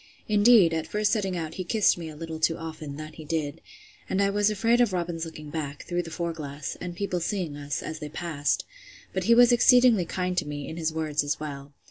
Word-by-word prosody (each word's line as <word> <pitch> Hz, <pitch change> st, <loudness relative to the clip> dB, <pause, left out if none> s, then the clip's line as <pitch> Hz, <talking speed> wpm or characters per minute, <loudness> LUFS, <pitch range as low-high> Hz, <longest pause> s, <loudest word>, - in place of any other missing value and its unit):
Indeed, 210 Hz, -4 st, +6 dB
at 160 Hz, -1 st, -2 dB
first 210 Hz, 0 st, +1 dB
setting 195 Hz, -5 st, 0 dB
out 160 Hz, -2 st, -4 dB
he -, -, -2 dB
kissed 210 Hz, +3 st, +3 dB
me 165 Hz, -2 st, -7 dB
a 155 Hz, -, -10 dB
little 160 Hz, 0 st, -6 dB
too 160 Hz, +1 st, +2 dB
often, 155 Hz, -3 st, -7 dB
that 155 Hz, 0 st, -8 dB
he 160 Hz, -, -8 dB
did; 155 Hz, -1 st, -3 dB, 0.5 s
and 190 Hz, -, 0 dB
I 200 Hz, 0 st, +3 dB
was 205 Hz, +1 st, +3 dB
afraid 230 Hz, +4 st, +2 dB
of 230 Hz, -6 st, +2 dB
Robin's 170 Hz, -2 st, -2 dB
looking 155 Hz, -2 st, -9 dB
back, 145 Hz, -2 st, -4 dB
through 175 Hz, 0 st, -1 dB
the 170 Hz, -, -8 dB
fore 170 Hz, +1 st, -3 dB
glass, 145 Hz, -3 st, -6 dB
and 180 Hz, -1 st, -5 dB
people 185 Hz, -2 st, -2 dB
seeing 175 Hz, -4 st, -2 dB
us, 145 Hz, -1 st, -4 dB
as 155 Hz, 0 st, -5 dB
they 150 Hz, -, -6 dB
passed; 155 Hz, -2 st, -1 dB, 0.5 s
but -, -, -1 dB
he 230 Hz, -, +6 dB
was 245 Hz, 0 st, +7 dB
exceedingly 240 Hz, -5 st, +5 dB
kind 180 Hz, +1 st, -2 dB
to 155 Hz, -, -6 dB
me, 145 Hz, -1 st, -5 dB
in 160 Hz, -, -7 dB
his 160 Hz, -1 st, -1 dB
words, 155 Hz, -2 st, -1 dB
as 145 Hz, 0 st, -2 dB
well. 140 Hz, -2 st, -7 dB
165 Hz, 230 wpm, -27 LUFS, 155-195 Hz, 0.5 s, was